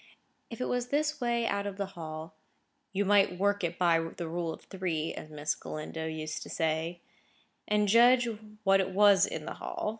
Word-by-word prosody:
If 230 - -8
it 255 - -1
was 245 0 -1
this 300 +2 0
way 235 -1 +1
out 200 -2 -1
of 200 -1 -6
the 200 - -1
Hall, 160 -2 -7 0.6
"you 200 +1 0
might 200 -2 +4
work 200 +1 +1
it 170 0 -2
by 170 -2 +4
the 165 +1 -5
rule 170 0 -2
of - - -9
three," 170 -5 -3
as 155 - -8
Miss 150 0 -1
Galindo 160 +1 -6
used 155 -1 -4
to - - -8
say, 160 +2 -1 0.7
and 210 0 +2
judge 240 +3 +6 0.4
what 195 -1 +5
it 190 - -2
was 200 0 +5
in - - -5
the - - -4
Hall. - - -3
190 Hz, 190 wpm, -30 LUFS, 160-210 Hz, 0.7 s, judge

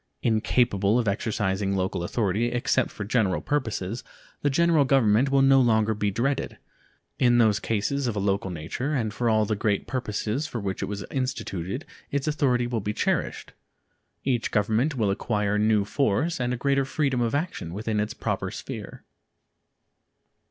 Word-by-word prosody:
Incapable 110 -2 +2
of 120 -3 0
exercising 100 -1 0
local 95 -2 -1
authority 105 +3 0
except 120 +1 +1
for 105 - -6
general 100 -4 +1
purposes, 115 -6 -2 0.4
the 145 - +2
General 165 +1 +4
Government 130 -2 +3
will 135 0 +4
no 135 0 +6
longer 110 -2 +3
be 105 -1 0
dreaded. 130 +7 -1 0.6
In 120 -2 +4
those 110 -4 +4
cases 125 +5 -1
of 115 - -2
a - - -1
local 100 0 0
nature 90 - -3
and 110 -5 -1
for 120 0 0
all 110 -1 +3
the 110 - -1
great 105 -1 0
purposes 120 +2 -2
for 120 - -4
which 95 -3 -3
it - - -2
was 100 -1 -5
instituted 125 - -3 0.2
its 140 +1 -2
authority 135 -5 +2
will 120 -2 -2
be 105 +2 -2
cherished. - - -1 0.7
Each 125 -4 0
Government 110 +8 +1
will 110 -5 +1
acquire 105 0 0
new 105 -1 +3
force 140 +8 0
and 125 0 0
a 125 - -1
greater 140 +2 +2
freedom 135 -2 0
of 120 +2 0
action 145 - -3
within 105 +3 -2
its 105 0 -2
proper - - -2
sphere. - - -8
115 Hz, 165 wpm, -26 LUFS, 105-130 Hz, 0.7 s, no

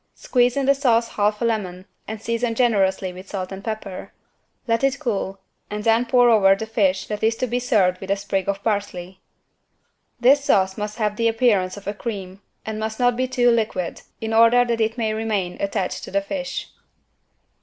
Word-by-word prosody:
Squeeze 245 0 +1
in 275 - +1
the 275 - +5
sauce 240 -4 +2
half 210 +2 0
a - - +2
lemon 190 -5 -2 0.2
and 220 0 -5
season 230 +1 -2
generously 195 -6 +1
with 185 +2 -11
salt 185 -2 -4
and 195 +1 -7
pepper. 215 -4 -6 0.6
Let 230 +2 +1
it 275 0 +2
cool 200 -7 -2 0.3
and 210 0 -4
then 230 +2 +3
pour 245 0 +5
over 195 -3 +5
the 220 - -5
fish 195 -4 +1
that 210 -1 -5
is 225 +1 +3
to 255 - -1
be 245 0 -1
served 200 -7 +2
with 190 - -8
a 200 - +3
sprig 195 -1 -2
of 200 0 -2
parsley. 190 -4 -3 1.0
This 275 +4 +5
sauce 190 -7 +2
must 210 +1 -5
have 210 -2 -1
the 230 - +2
appearance 220 -5 +2
of 205 - -11
a 205 - -2
cream 200 -4 -6 0.2
and 220 -1 -4
must 220 0 -4
not 245 -1 +3
be 255 +1 0
too 245 -1 +3
liquid, 215 -7 -1 0.2
in 225 0 -3
order 230 +2 +6
that 235 -1 -1
it 220 +2 0
may 220 -2 0
remain 215 -5 -2
attached 195 -2 -2
to - - -9
the 200 +1 0
fish. 270 +6 -5
220 Hz, 195 wpm, -22 LUFS, 195-235 Hz, 1.0 s, order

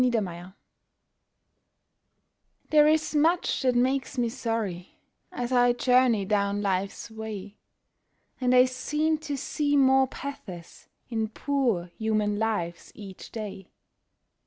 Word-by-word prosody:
SORRY 195 -8 -1 2.3
There 300 -1 +6
is 310 0 +2
much 325 +4 +2
that 255 -2 +2
makes 260 +2 0
me 240 -1 +1
sorry 225 -7 -4 0.3
as 245 0 -4
I 245 -1 +4
journey 245 -4 +3
down 200 0 0
life's 195 +3 -2
way, 215 -2 -7 0.8
And 255 -1 +2
I 250 0 +7
seem 300 +5 -1
to 295 -3 -4
see 290 +1 0
more 265 -1 +5
pathos 200 -12 -9 0.2
in 225 -2 -1
poor 240 -6 -1
human 215 -2 0
lives 190 -7 -2
each 195 -3 -10
day. 205 -4 -7
240 Hz, 110 wpm, -27 LUFS, 205-265 Hz, 2.3 s, I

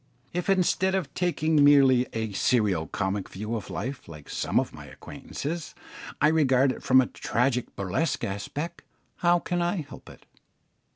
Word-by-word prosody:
If, 180 +2 -2
instead 190 0 +2
of 170 -8 -3
taking 160 -4 +2
merely 135 -3 +6
a 110 -1 -3
serio 100 -5 +1
comic 95 +4 -2
view 105 +4 -4
of 105 -4 -6
life, 130 +4 -5
like 75 -4 -11
some - - +1
of - - -3
my - - -10
acquaintances, 160 +2 -7 0.4
I 150 - +5
regard 135 -4 +3
it - - -7
from 130 0 +5
a - - 0
tragic 125 +1 -1
burlesque 100 - -1
aspect, 145 +12 -4 0.4
how 175 0 +3
can 175 0 -2
I 175 +3 0
help 145 - -12
it? - - -15
135 Hz, 160 wpm, -26 LUFS, 110-165 Hz, 0.4 s, merely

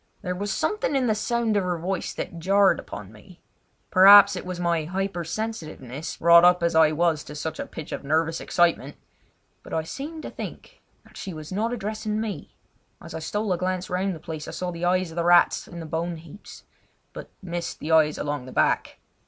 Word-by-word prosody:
There 180 - -2
was 200 +3 -3
something 425 -8 -1
in 265 -2 +2
the 220 - +2
sound 225 +1 0
of 200 - +2
her 180 -1 -1
voice 180 +2 -3
that 170 - -5
jarred 195 +3 +3
upon 105 -1 -9
me. 140 - -17 0.5
Perhaps 200 +1 +8
it 180 - -6
was 180 -1 -5
my 170 -3 0
hyper 185 +1 -3
sensitiveness, 160 - -6
wrought 170 0 +7
up 180 0 +5
as 170 - +2
I 160 -1 +5
was 160 -1 +1
to 150 - -9
such 160 +1 -5
a - - -4
pitch 155 - -9
of - - -5
nervous 160 +3 0
excitement, 170 -5 +1 0.7
but - - -7
I 160 - 0
seemed 300 - -7
to - - -6
think - - -9 0.2
that - - -17
she 190 -5 -6
was 155 +1 -9
not 215 +5 -1
addressing 215 -1 -3
me. 220 -2 -5 0.4
As - - -11
I 160 - -4
stole 205 +5 -2
a 175 - -3
glance 185 0 -2
round 185 +1 -1
the - - -10
place 155 -1 -7
I - - -6
saw 180 -1 -3
the 170 0 -4
eyes 185 -1 +1
of 160 - -11
the 170 - +1
rats 175 0 +4
in 170 - -9
the 165 - -6
bone 165 +2 -3
heaps, 165 +5 -13 0.5
but - - -9
missed 175 -1 -4
the 155 - -5
eyes 155 -1 +4
along 145 -3 -4
the - - -9
back. - - +1
175 Hz, 210 wpm, -25 LUFS, 160-195 Hz, 0.7 s, Perhaps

